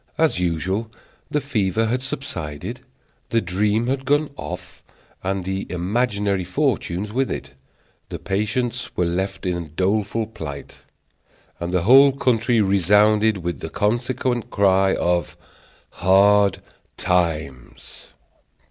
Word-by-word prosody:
As 160 - +2
usual, 95 +6 -1 0.4
the 150 - +1
fever 115 -6 0
had 125 +3 -1
subsided, 120 - -5 0.5
the 115 - +2
dream 105 +4 0
had 135 +1 -1
gone 145 +2 +1
off, 90 -6 -8 0.4
and 95 0 -1
the 95 +1 -3
imaginary 100 +1 0
fortunes 105 - -1
with 130 +2 0
it; 70 0 -5 0.6
the - - -5
patients 115 +5 -2
were 90 - +2
left 95 +3 -2
in 85 -4 -3
doleful 105 +4 0
plight, 80 -11 -8 0.8
and 85 0 -3
the 90 -2 +1
whole 135 +6 +7
country 120 -3 +2
resounded 105 +3 +3
with 85 0 -3
the - - -6
consequent 120 +2 -1
cry 95 -1 +3
of 90 -2 -1 0.5
"hard 100 +2 +4 0.3
times." 80 -8 -2
100 Hz, 115 wpm, -22 LUFS, 90-120 Hz, 0.8 s, whole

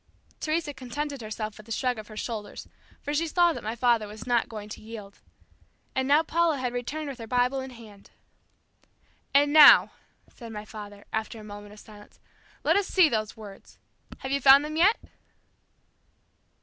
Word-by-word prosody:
Teresa 310 -1 -2
contented 280 +2 -5
herself 215 -1 -6
with 215 0 -14
a - - -8
shrug 250 0 -1
of 215 - -10
her 215 - -11
shoulders, 215 -2 -6 0.4
for 290 - -3
she 330 +3 0
saw 345 +1 +3
that - - -8
my 220 +2 -3
father 235 -3 +2
was 215 +1 -10
not 240 -2 +1
going 210 -2 -8
to - - -9
yield. 215 -3 -10 0.7
And 265 0 -1
now 295 +3 +4
Paula 330 -1 +1
had 250 -2 -3
returned 290 +5 -4
with 270 -3 -7
her 225 - -8
Bible 250 +3 +1
in 265 0 -6
hand. 220 -5 -14 1.2
"And 285 +1 +3
now," 305 -2 +9 0.4
said 230 -2 -12
my 210 0 -7
father, 205 -2 -10
after 220 +1 -3
a - - -11
moment 205 0 -10
of 210 - -14
silence, 210 -1 -16 0.4
"let - - +3
us 405 -1 +1
see 365 -5 +4
those 215 -3 -2
words. 205 -3 -13 0.4
Have 265 - -5
you 280 0 0
found 275 +2 +7
them 305 +1 -5
yet?" 380 +8 +4
245 Hz, 180 wpm, -27 LUFS, 215-290 Hz, 1.2 s, now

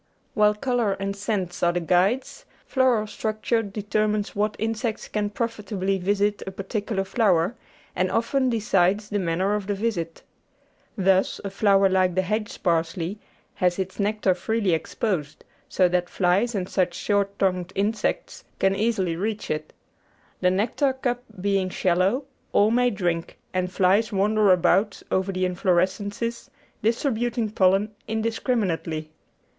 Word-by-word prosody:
While 210 -3 +4
colour 240 -3 0
and 195 0 -3
scent 200 -3 -3
are 175 0 +3
the 175 - 0
guides, 190 - +1 0.2
floral 255 -5 +2
structure 220 +2 -1
deter 210 +1 -1
mines 210 -1 -2
what 210 +1 0
insects 225 0 -2
can 210 -1 -1
profitably 205 -4 -2
visit 205 +2 +1
a - - -1
particular 195 +1 -3
flower, 195 -1 +2 0.4
and 185 +1 +1
often 260 +3 +1
decides 205 -2 +1
the 205 - 0
manner 185 +3 0
of 210 -2 -2
the 205 - 0
visit. 195 -6 -3 0.7
Thus 190 -1 +2
a 200 - -4
flower 195 -1 +4
like 185 -2 +2
the 185 - +2
hedge 210 +3 -3
parsley 170 +2 0 0.3
has 180 -1 +1
its 190 +1 -4
nectar 205 -2 +2
freely 200 +1 0
exposed 160 -2 -2 0.2
so 185 - +3
that 180 0 0
flies 195 +6 +1
and 185 -2 -2
such 180 -3 0
short 200 -1 0
tongued 180 -2 0
insects 210 +3 -1
can 195 0 +2
easily 195 -5 0
reach 210 +4 -3
it; 155 0 -3 0.7
the 180 - +3
nectar 225 +8 +1
cup 245 -2 -2 0.2
being 195 -1 +1
shallow 185 +9 +1 0.3
all 210 +2 +4
may 245 +1 +3
drink, 175 -6 -2 0.2
and 180 0 -1
flies 195 +4 +3
wander 205 0 +3
about 185 +3 +2
over 190 +1 +1
the 185 0 0
inflor 180 0 +1
escences 205 +7 -2 0.3
distributing 235 -1 0
pollen 195 +1 +3 0.2
indiscriminately. 215 - -1
200 Hz, 140 wpm, -24 LUFS, 185-220 Hz, 0.7 s, While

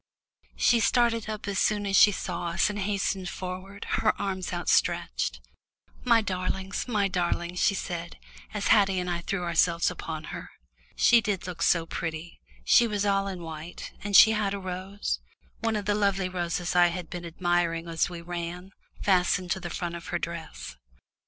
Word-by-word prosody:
She 235 - +4
started 230 -2 +2
up 215 -1 -5
as 200 -1 -1
soon 205 -1 +1
as 195 -1 0
she 205 - +8
saw 180 -3 -4
us 170 +4 +1
and 205 - -5
hastened 195 -2 -1
forward, 185 +2 -7
her 215 - +1
arms 190 -2 -3
outstretched. 60 - 0 0.6
"My 235 -2 +5
darlings, 190 +1 -3
my 210 -5 +1
darlings," 175 -1 -1
she 195 - +3
said, 175 -2 -5 0.3
as 210 -1 -2
Haddie 195 -3 +4
and 180 - -3
I 170 0 -2
threw 180 +1 -3
ourselves 170 0 +2
upon 160 -2 -6
her. - - -7 0.5
She 235 -1 +5
did 205 -3 -2
look 175 -2 -6
so 170 -1 +3
pretty; 165 0 -5 0.2
she 240 - +6
was 210 -2 -1
all 195 -1 +2
in 185 -3 -5
white, 160 +1 -8
and 205 0 -1
she 220 - +10
had 210 -2 0
a - - -5
rose 185 - -4 0.4
one 225 -1 0
of 205 -1 -2
the 205 - +2
lovely 200 -2 +1
roses 175 -1 -2
I 175 0 +6
had 175 0 -4
been 175 +1 -7
admiring 170 -1 0
as 165 +2 0
we 175 -1 -7
ran 175 +2 -6 0.3
fastened 180 -1 +2
to 190 - 0
the 175 -2 -6
front 170 0 -4
of 170 0 -8
her 175 - -1
dress. 165 - -6
185 Hz, 180 wpm, -27 LUFS, 170-200 Hz, 0.6 s, she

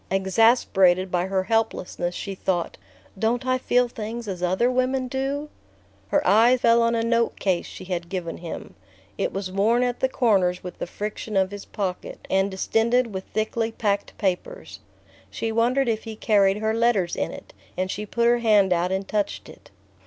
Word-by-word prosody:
Exasperated 190 -2 +3
by 180 0 0
her 190 -1 0
helplessness, 185 -5 -1
she 200 - -5
thought: 185 -2 -2 0.4
"Don't 235 +4 0
I 255 0 +1
feel 250 0 +2
things 230 -1 -6
as 185 -3 -5
other 190 +8 +2
women 255 +1 0
do?" 270 +3 -2 0.6
Her - - +1
eye 225 +6 +5
fell 235 -1 +4
on 230 0 +2
a 225 - 0
note 235 0 +1
case 185 -3 0
she 185 - -10
had 175 -2 -4
given 175 -3 -4
him. 170 -1 -8 0.5
It - - 0
was 195 -1 -4
worn 220 +6 +2
at 245 -1 -1
the 260 - +1
corners 195 -9 +2
with 180 -1 -8
the - - -3
friction 210 +2 -4
of 190 0 +2
his 205 -1 -8
pocket 190 -3 -5
and 195 +1 +2
distended 225 +4 +1
with 190 0 -5
thickly 225 +1 -2
packed 205 -3 -2
papers. 205 - -3 0.5
She 225 - -3
wondered 245 +4 +2
if 220 -1 -1
he 220 -1 -6
carried 200 -3 +3
her 220 +1 0
letters 225 -6 +1
in - - -2
it, - - -11 0.2
and 185 +1 -1
she 210 +1 -5
put 235 +3 0
her 240 0 +4
hand 210 -5 +4
out 175 +1 0
and 190 0 -2
touched 210 -2 -2
it. - - -15
210 Hz, 180 wpm, -24 LUFS, 190-235 Hz, 0.6 s, eye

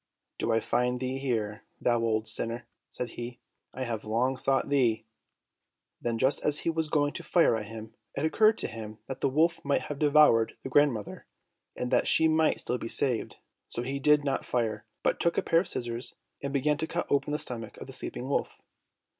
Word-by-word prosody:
"Do - - 0
I 115 - +3
find 125 +2 0
thee 130 +1 -2
here, 110 -6 -2 0.2
thou 120 -1 +2
old 110 -1 0
sinner!" 115 +2 -1 0.2
said 125 - -4
he. 120 +1 -7 0.3
"I 130 - -4
have 115 -3 -3
long 120 +5 +1
sought 135 +1 +1
thee!" 120 -6 +2 1.0
Then 115 -1 -1
just 130 +5 +2
as 150 0 +2
he 165 - 0
was 160 -1 -1
going 145 -2 +1
to - - -5
fire 170 -9 +4
at 105 -2 -4
him, 110 0 -9 0.2
it 140 - 0
occurred 215 +7 +4
to - - -2
him 110 -1 -8
that 135 - -7
the - - +2
wolf 165 +5 +2
might 140 0 +1
have 145 -1 -6
devoured 145 -7 +5
the - - -5
grandmother, 130 -6 +1 0.5
and 125 0 -3
that - - +3
she 160 - +5
might 160 0 +2
still 125 - -2
be - - -5
saved, 125 -3 0 0.3
so 120 - -4
he 135 +2 -3
did 150 +1 +4
not 135 -2 -1
fire, 110 -3 -1 0.2
but - - +1
took 170 - +1
a - - +2
pair 165 - +4
of 180 - 0
scissors, 120 0 -1 0.3
and 140 - -3
began 145 +2 +1
to 160 - -1
cut 175 +2 -2
open 140 +1 +1
the 150 - +1
stomach 115 -6 -4
of - - -8
the - - -9
sleeping 125 - -3
wolf. 140 - -1
130 Hz, 205 wpm, -29 LUFS, 115-145 Hz, 1.0 s, devoured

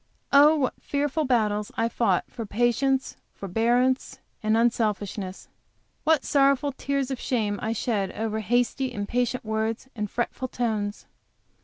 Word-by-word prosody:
Oh, 290 +3 +7
what 275 -4 0
fearful 290 +2 -1
battles 210 -5 +1
I 230 - +2
fought 230 0 +1
for 235 - -6
patience, 240 +5 +1 0.2
forbearance 240 +7 +1 0.2
and 215 +1 +2
unselfishness! 210 -4 -1 0.6
What 315 -1 +3
sorrowful 275 0 +3
tears 275 0 -2
of 260 - -3
shame 210 -5 -1
I 220 +1 -1
shed 205 -4 -1
over 220 0 -2
hasty, 245 +4 0
impatient 240 +4 -1
words 220 +3 -2
and 210 -2 -3
fretful 240 +3 -2
tones! 215 -5 -2
235 Hz, 130 wpm, -26 LUFS, 215-265 Hz, 0.6 s, Oh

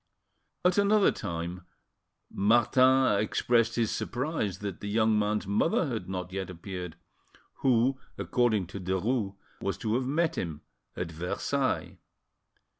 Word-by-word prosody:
At 180 +2 +4
another 205 0 +4
time, 85 +2 -5 0.6
Martin 125 +2 +4
expressed 115 +2 +2
his 115 -2 +1
surprise 125 - -2
that 100 -4 -5
the 105 - -5
young 110 0 +3
man's 105 0 0
mother 120 - +1
had 115 -6 -4
not 90 -1 -4
yet 95 -2 -3
appeared, 90 -1 -6 0.6
who, 130 +1 +2 0.2
according 115 -6 +1
to 100 - -4
Derues, 95 +3 -1 0.3
was 100 - -2
to 110 -1 -2
have 125 +2 0
met 160 +4 +1
him 80 -4 -4 0.4
at 90 -2 -3
Versailles. 85 +3 -2
105 Hz, 125 wpm, -29 LUFS, 95-125 Hz, 0.6 s, At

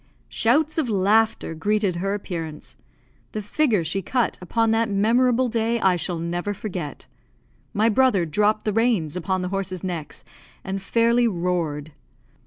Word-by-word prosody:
Shouts 300 +7 +2
of 275 -6 0
laughter 210 -2 +2
greeted 200 +2 0
her 195 +3 -1
appearance. 165 -6 -6 0.6
The 215 - -3
figure 215 - +1
she 180 +5 -1
cut 245 +5 0
upon 225 +5 +1
that 225 0 +1
memorable 240 +5 +3
day 230 0 0
I 190 -4 +3
shall 175 0 -2
never 175 +4 -3
forget. 180 -8 -6 0.7
My 215 +2 +2
brother 225 -5 +3
dropped 210 +6 +1
the 210 - 0
reins 220 -9 +1
upon 185 +1 -1
the 180 - -2
horses' 190 -2 -3
necks, 175 -5 -5 0.4
and 190 0 -4
fairly 235 +4 +3
roared. 170 -6 -2
200 Hz, 145 wpm, -23 LUFS, 180-230 Hz, 0.7 s, memorable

